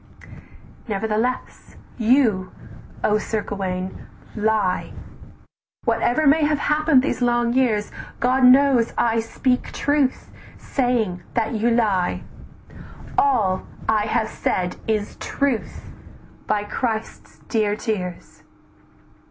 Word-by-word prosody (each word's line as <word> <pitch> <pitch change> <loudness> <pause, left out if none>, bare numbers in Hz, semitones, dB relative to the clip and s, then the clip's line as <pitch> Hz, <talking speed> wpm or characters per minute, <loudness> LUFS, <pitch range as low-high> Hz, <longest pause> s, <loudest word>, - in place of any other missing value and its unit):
"Nevertheless 220 +4 -2 0.2
you, 225 -6 +3 0.5
O 210 0 +3
Sir 215 0 -2
Gauwaine, 185 -2 -4 0.3
lie, 210 -4 0 0.9
Whatever 305 +6 +1
may 300 +3 +5
have 300 0 +2
happen'd 300 -2 +3
these 275 - -2
long 240 -1 +2
years, 230 -5 +1 0.3
God 255 +2 +2
knows 255 -2 +5
I 230 -1 +2
speak 250 +3 -1
truth, 285 -2 0 0.3
saying 235 -9 -1
that 230 0 0
you 225 +2 +1
lie! 210 -6 +1 0.9
"All 215 -10 +2 0.2
I 215 -1 +2
have 220 -1 0
said 180 -1 -2
is 215 -2 -1
truth, 275 -5 -2 0.6
by 210 -1 +1
Christ's 220 +1 -4
dear 215 -3 +1
tears." 185 -6 -5
225 Hz, 100 wpm, -22 LUFS, 210-255 Hz, 0.9 s, may